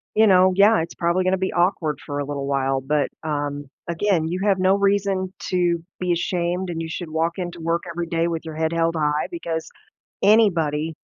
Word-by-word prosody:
you 220 +1 +5
know, 185 -1 +5
yeah, 205 0 +5
it's 165 - -5
probably 170 +2 +1
gonna 185 +1 +2
be 190 0 -1
awkward 175 -4 +1
for 145 0 -4
a 145 - -2
little 140 -1 -4
while, 135 -1 0
but, 145 +2 0
um, 145 -2 -3 0.2
again, 170 -1 +1
you 180 +3 -2
have 200 -2 +2
no 185 +1 +4
reason 195 -2 +1 0.2
to 175 -2 +1 0.2
be 180 -1 -1
ashamed 175 +1 -1
and 165 -1 -3
you 165 - -4
should 165 0 -5
walk 165 +2 -1
into 175 -2 -5
work 165 +1 -1
every 170 0 -4
day 165 0 0
with 165 -1 -3
your 160 -1 -7
head 160 0 0
held 165 0 +1
high, 150 -1 0
because 165 - -4 0.5
anybody 165 -8 +3
170 Hz, 200 wpm, -22 LUFS, 160-185 Hz, 0.5 s, you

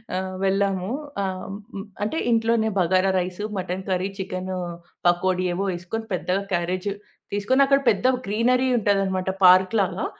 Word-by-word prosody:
ఆహ్, 185 0 -3
వెళ్లాము 195 -1 +1 0.3
ఆహ్, 185 -1 -4 0.6
అంటే 215 +10 -2
ఇంట్లోనే 225 -1 +2
bagara 185 +2 +3
rice, 180 +3 -4
mutton 185 0 -4
curry, 185 +1 0
chicken 185 -1 -4 0.5
pakodi 185 +1 +2
ఏవో 195 +3 -1
వేసుకొని 185 +6 -5
పెద్దగా 185 +2 0
క్యారేజ్ 180 +3 -1 0.4
తీసుకొని 205 +7 +2
అక్కడ 275 0 +4
పెద్ద 225 +3 +2 0.2
గ్రీనరీ 245 +5 +2
ఉంటదన్నమాట. 195 -3 0 0.2
పార్క్ 185 +3 +6
లాగా. 190 +2 -1
190 Hz, 130 wpm, -24 LUFS, 185-205 Hz, 0.6 s, పార్క్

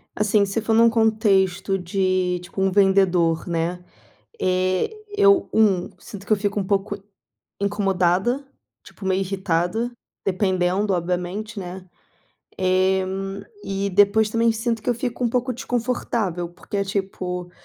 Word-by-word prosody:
Assim, 210 -1 +3
se 200 +3 -2
for 225 0 0
num 230 +1 +6
contexto 200 -4 +2
de, 185 0 0
tipo 185 +2 -6
um 195 - +2
vendedor, 185 -4 +3
né, 170 +2 -2 0.6
eh, 185 - +1 0.3
eu, 400 -2 +5
1 195 -5 +3
sinto 200 -1 -10
que - - -6
eu - - +2
fico 205 0 -2
um - - 0
pouco 205 0 0 0.7
incomodada, 200 +5 +1 0.4
tipo 195 - -10
meio 190 0 +1
irritada, 190 +3 -1 0.4
dependendo 190 +1 +1
obviamente, 180 +5 -3
né, 185 0 -8 0.7
eh, 185 +1 +2 0.6
e 195 0 -2
depois 205 +3 +4
também 230 0 +3
sinto 225 0 -2
que - - -2
eu 245 - +2
fico 245 0 -3
um 235 - +2
pouco 250 +1 0
desconfortável, 235 -8 -2
porque 175 +3 -7
é 200 - +1
tipo, 185 -2 -4
195 Hz, 135 wpm, -23 LUFS, 185-220 Hz, 0.7 s, num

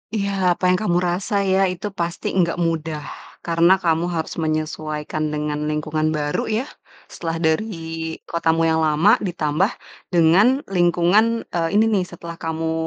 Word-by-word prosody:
Iya, 195 -3 +1
apa - - -20
yang 185 - +2
kamu 175 -5 +1
rasa 180 +4 -2 0.2
ya, 190 0 +3
itu 180 +3 -4
pasti 170 0 -2
gak 170 - -1
mudah. 160 -2 -3 0.4
Karena 170 +2 +4
kamu 170 -2 0
harus 160 - -3
menyesuaikan 155 -1 -3
dengan 150 0 -2
lingkungan 155 +1 -1
baru 145 -1 -2
ya, 220 +3 0 0.5
setelah 165 -1 -4
dari 160 +8 +2 0.6
kotamu 165 -1 0
yang 160 - +2
lama 175 +11 +4
ditambah 175 -1 0 0.5
dengan 170 +7 +5 0.3
lingkungan, 180 +7 +3
eee, 165 -1 0
ini 220 +1 +5
nih, 195 -3 +2
setelah 170 -1 -9
kamu, 160 0 -2
170 Hz, 145 wpm, -21 LUFS, 155-185 Hz, 0.6 s, dengan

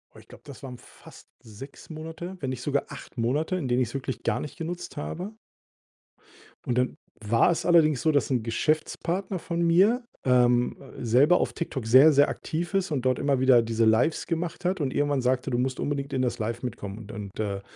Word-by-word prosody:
Oh, - - -14
ich - - -16
glaube, - - -15
das 140 -2 -11
waren 125 -2 -7
fast - - -16
6 115 +6 -12
Monate, 160 +4 -7
wenn 135 -5 -3
nicht 130 -1 -5
sogar 140 -1 0
8 135 -1 -11
Monate, 145 +10 0
in 145 - -3
denen 125 +1 +1
ich's 115 - -6
wirklich 135 -1 -4
gar - - 0
nicht 150 - -7
genutzt 175 0 -6
habe. 180 +8 -5 1.3
Und 125 -3 -1
dann 125 0 0 0.2
war 115 +10 +3
es 170 - -2
allerdings 160 -5 +4
so, 160 - +3
dass 145 - +1
'n 125 -4 +1
Geschäftspartner 160 - -1
von 170 +1 -3
mir, 195 +9 +4 0.2
ähm, 125 -1 +3 0.2
selber 130 +9 +4
auf - - -1
TikTok 135 -8 -4
sehr, 130 +7 +7
sehr 145 0 +5
aktiv 170 +4 -4
ist 195 -3 0
und 135 -5 -1
dort 130 -1 +2
immer 140 -2 +1
wieder 130 -2 +5
diese 115 0 0
Lives 110 +9 +2
gemacht 170 +1 -3
hat. 180 -1 0
Und 135 -3 -1
irgendwann 145 -2 +1
sagte: 130 +1 0
„Du 120 - 0
musst 130 +1 -1
unbedingt 140 -1 -2
in 130 - 0
das 125 - -1
live 115 +2 -3
mitkommen. 105 -5 -5
Und 110 -1 -10
und, 105 -3 -8
äh, 100 -2 -2
135 Hz, 205 wpm, -26 LUFS, 120-165 Hz, 1.3 s, sehr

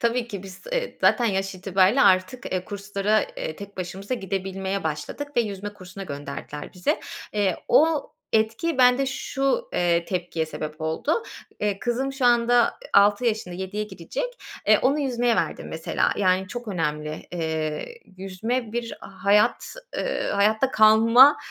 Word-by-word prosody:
Tabii 235 +1 0
ki, 200 -5 -6
biz, 190 -1 -11
eee, - - -2
zaten 245 - +4
yaş 195 -2 0
itibarıyla 190 +6 +3
artık, 190 +5 +2
eee, 185 -1 -1
kurslara, 205 +1 0
eee, 155 - -6
tek 200 0 -10
başımıza 190 +5 -4
gidebilmeye 195 -1 -3
başladık 160 - -4
ve - - +6
yüzme 205 -2 -4
kursuna 195 -1 -9
gönderdiler 145 -1 -7
bizi. 180 -1 -1 0.3
Eee, 200 -4 +1
o 315 -1 +3 0.2
etki 225 +8 +1
bende 250 +2 +5
şu, 270 - -1
eee, 170 -1 +2
tepkiye 175 -3 -2
sebep 155 0 -6
oldu. 160 - -1 0.4
Eee, 205 -2 0
kızım 250 +4 -1
şu 270 -1 -3
anda, 240 0 +4
ııı, - - +1 0.2
6 205 +4 +5
yaşında, 215 -6 -1
7'ye 190 +3 -3
girecek. 210 - -5 0.4
E, - - +6
onu 280 +4 +2
yüzmeye 245 -4 +1
verdim, - - -2
mesela. - - 0
Yani, 185 -1 +2
çok 240 +2 -6
önemli. 150 -4 -3
Eee, 160 -3 -2 0.3
yüzme 215 +5 -3
bir 235 -1 -3
hayat, 200 - +1 0.2
ııı, - - -1
hayatta 220 +6 +3
kalma, 230 +5 +7
205 Hz, 150 wpm, -24 LUFS, 185-240 Hz, 0.4 s, kalma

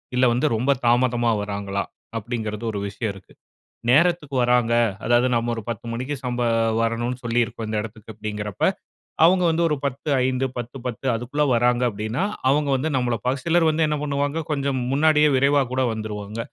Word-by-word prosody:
இல்ல 125 - +4
வந்து 120 - +1
ரொம்ப 125 +5 +1
தாமதமா 120 -1 +3
வராங்களா? 100 -1 -3 0.3
அப்படிங்குறது 110 -1 -4
ஒரு 100 - -4
விஷயம் 105 +2 -3
இருக்கு. 95 -1 -16 0.6
நேரத்துக்கு 150 0 +3
வராங்க, 120 -1 +3 0.3
அதாவது 120 +2 +3
நம்ப 115 +1 0
ஒரு 115 - -5
10 115 0 -5
மணிக்கு 130 +5 -3
சம்ப 125 -1 -3 0.4
வரணும்னு 120 +2 -1
சொல்லியிருக்கோம். 115 -1 -1
இந்த 110 - -2
இடத்துக்கு 110 0 -9
அப்டீங்கிறப்ப, 105 -1 -5 0.6
அவங்க 180 +2 +5
வந்து 165 +1 +1
ஒரு 150 - 0
10:05, 130 -1 0
10:10 120 0 -6
அதுக்குள்ள 125 +6 -1
வராங்க 120 +1 +2
அப்டீன்னா, 110 - -2 0.3
அவங்க 145 +1 +2
வந்து 155 +5 -2
நம்பள 120 -2 0
ப 130 - +2
சிலர் 170 -1 +3
வந்து 155 0 +2
என்ன 150 -1 -1
பண்ணுவாங்க, 145 +2 -1
கொஞ்சம் 140 -2 -1
முன்னாடியே 150 +1 +4
விரைவா 140 +1 +4
கூட 130 0 +1
வந்துருவாங்க. 105 0 -6
125 Hz, 155 wpm, -23 LUFS, 115-140 Hz, 0.6 s, அவங்க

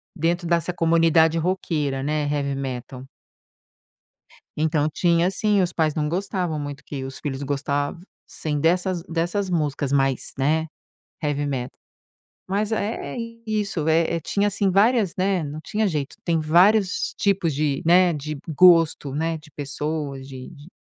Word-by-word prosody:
dentro 170 +1 0
dessa 170 +1 +1
comunidade 165 -1 +3
roqueira, 155 -6 -1
né, 150 +1 0
heavy 140 -1 -1
metal 130 -1 -5 1.5
Então, 155 -1 +1
tinha 170 +3 +2
sim, 205 0 +2
os 175 -1 -1
pais 155 -2 +1
não 150 -1 0
gostavam 180 -2 -2
muito 145 0 -6
que 135 -2 -6
os 135 0 -7
filhos 135 -2 -4
gostassem 145 +2 -3
dessas 180 +2 +1
dessas 175 +4 -2
músicas 145 -5 -1
mais, 135 -2 +1
né, 160 +4 +1 0.6
heavy 145 -1 -1
metal. 130 -3 -4 0.7
Mas 205 +3 -1
é 215 +1 -3
é - - -6 0.3
isso, 200 -7 -1
eh 165 +1 +2
eh, - - -3
tinha 200 +6 0
assim 200 -1 0
várias, 205 0 +3
né, 190 -2 +1
não 150 +2 -6
tinha 210 +5 -1
jeito. 150 -5 -3
Tem 165 -2 +1
vários 185 +6 +3
tipos 195 -5 +1
de, 145 -1 0
né, 180 +1 +5
de 150 0 -5
gosto, 165 -4 +4
né, 160 +2 -1
de 150 0 -16
pessoas, 145 -1 -4
de 130 -2 -9
de 150 -1 -14
160 Hz, 145 wpm, -23 LUFS, 145-180 Hz, 1.5 s, né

